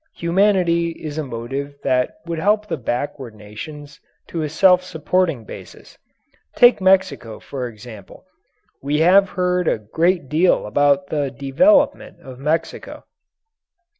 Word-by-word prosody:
Humanity 170 -1 +1
is 155 -1 -7
a - - -2
motive 135 +3 -6
that 125 -1 -1
would 170 -1 -4
help 210 +4 +1
the - - -2
backward 125 -1 -4
nations 140 +8 -10 0.3
to 165 - -4
a 155 - -3
self 180 +3 +4
supporting 165 -5 -1
basis. - - -12 0.6
Take 245 -4 +5
Mexico, 185 - +1
for 130 -3 -6
example. 110 -3 -13 0.6
We 145 +3 -1
have 190 +3 +5
heard 180 -1 0
a - - +2
great 165 - -1
deal 165 +6 +2
about 140 +5 +2
the 145 -3 -1
"development" 270 - +1
of 130 -1 -12
Mexico. 155 +4 -3
150 Hz, 130 wpm, -20 LUFS, 130-180 Hz, 0.6 s, Take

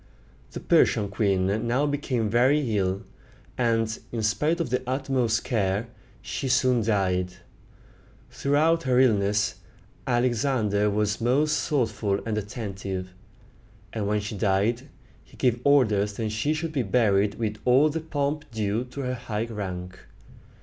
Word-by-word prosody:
The - - -5
Persian 105 -2 +3
queen 100 +1 0
now 130 +5 +2
became 140 -6 -1
very 125 +2 +2
ill, 95 -1 0 0.5
and, 115 -2 0
in 115 -2 -3
spite 150 +10 +1
of 165 -8 -2
the 125 0 +1
utmost 130 -4 0
care, 105 0 -1 0.3
she 135 - -4
soon 125 -1 +3
died. 95 -4 0 1.0
Throughout 155 +4 +2
her 130 -4 +2
illness, 105 -4 +2 0.5
Alexander 120 -4 +1
was 105 +1 -1
most 145 +6 +1
thoughtful 110 -7 0
and 110 -2 -1
attentive; 95 -3 -5 0.8
and 105 -3 -2
when 105 0 +1
she 105 +1 -5
died, 105 +7 0 0.3
he - - -20
gave 120 -2 +1
orders 110 -8 +3
that 110 +1 -3
she 125 +9 0
should 160 +1 -3
be 145 -4 0
buried 100 -2 +2
with 110 -2 -3
all 130 +5 +5
the 160 +2 -2
pomp 150 -1 -2
due 110 +1 -1
to 130 +3 -7
her 125 -1 -2
high 110 -3 -3
rank. 95 -5 -6
115 Hz, 135 wpm, -26 LUFS, 105-130 Hz, 1.0 s, all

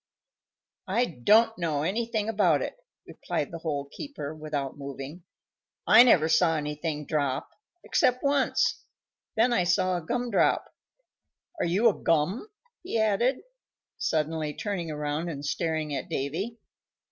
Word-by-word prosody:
"I 225 +6 +2
don't 215 - +3
know 155 -4 -1
anything 220 +3 -1
about 185 -10 +2
it," - - -4 0.3
replied 145 - -4
the 165 - -6
Hole 145 -4 -3
keeper, 280 - -6
without 150 -3 -4
moving. 140 +4 -8 0.6
"I - - +8
never 180 -11 +6
saw 165 0 +3
anything 150 0 -3
drop 140 -4 -1 0.3
except 250 0 +2
once. 280 -1 +1 0.5
Then 240 +2 +3
I 230 - +3
saw 185 +1 +2
a - - -4
gum 245 +7 -2
drop. 200 - +3 0.9
Are - - +1
you 195 +8 +3
a 220 - +5
gum?" 170 - 0 0.3
he 350 -9 -3
added, 220 +5 +2 0.6
suddenly 155 -1 -1
turning 190 -6 -3
around 150 +2 -3
and 145 -3 -6
staring 155 -1 -1
at - - -4
Davy. 175 - -3
165 Hz, 135 wpm, -27 LUFS, 150-220 Hz, 0.9 s, I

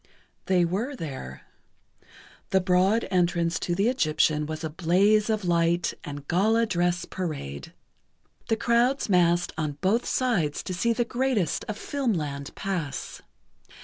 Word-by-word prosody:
They 180 -2 +3
were 215 +11 -2
there. 130 - -7 1.1
The 190 - +3
broad 185 +4 +2
entrance 170 -2 +1
to 175 - -1
the 200 +4 +2
Egyptian 155 - +1
was 155 +1 -5
a 160 - -2
blaze 195 +7 +3
of 215 -3 0
light 170 0 +1
and 145 -1 -8
gala 220 +6 +3
dress 175 -3 0
parade. 145 - -5 0.8
The 225 - +3
crowds 240 +3 +2
massed 175 -2 +3
on 155 -2 -1
both 205 +6 +1
sides 195 - 0
to 185 - -4
see 230 +6 +1
the 235 +1 0
greatest 245 -6 0
of 215 - -5
filmland 160 - -3
pass. 175 -8 -4
180 Hz, 135 wpm, -26 LUFS, 165-220 Hz, 1.1 s, They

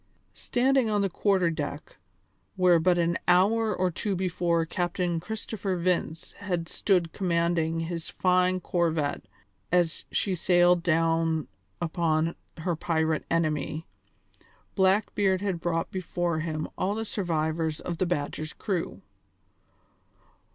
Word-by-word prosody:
Standing 255 -1 +1
on 210 -1 +1
the 195 - 0
quarter 185 -3 +2
deck 145 -2 -5 0.6
where 180 -2 +5
but 175 +2 +3
an 170 0 +1
hour 215 +5 +4
or 185 -2 0
two 200 +3 -2
before 175 -2 0
Captain 175 0 -1
Christopher 205 0 -4
Vince 170 -2 -1
had 180 -4 -2
stood 180 -4 +1
commanding 170 -3 0
his 165 0 -4
fine 185 0 +2
corvette 165 -5 0 0.5
as 175 -2 +1
she 195 - 0
sailed 175 0 +4
down 165 -1 +1 0.3
upon 165 -1 0 0.2
her 170 +1 -1
pirate 160 -1 0
enemy, 155 -1 -1 0.9
Blackbeard 190 0 +2
had 195 -4 -1
brought 165 -1 -1
before 175 -2 -2
him 155 -1 -3
all 195 +3 0
the 225 0 -3
survivors 160 -5 -1
of 170 -2 -5
the 185 - +1
Badger's 155 -1 -3
crew. 185 -5 -3
175 Hz, 120 wpm, -27 LUFS, 165-185 Hz, 0.9 s, where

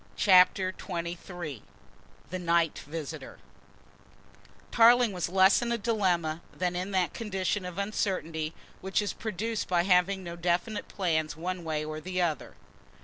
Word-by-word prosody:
CHAPTER 185 -1 +5
XXIII 170 - -6 0.7
THE 185 - -3
NIGHT 170 -2 +1
VISITOR 155 -1 -6 1.3
Tarling 240 0 +6
was 180 -3 -2
less 190 +3 +5
in 240 0 -1
a 235 - +1
dilemma 180 -8 0
than 180 -1 -2
in 180 +2 -2
that 185 -5 0
condition 195 -2 -2
of 180 0 -7
uncertainty 175 -6 -2 0.2
which 190 +1 -1
is 205 -1 -1
produced 220 +1 -3
by 175 -1 +2
having 190 +1 +3
no 170 -1 -6
definite 175 +5 -1
plans 160 -5 -1
one 180 +1 -4
way 155 -2 -2
or 155 0 -5
the 185 +2 -3
other. 170 -4 -1
180 Hz, 140 wpm, -29 LUFS, 170-200 Hz, 1.3 s, Tarling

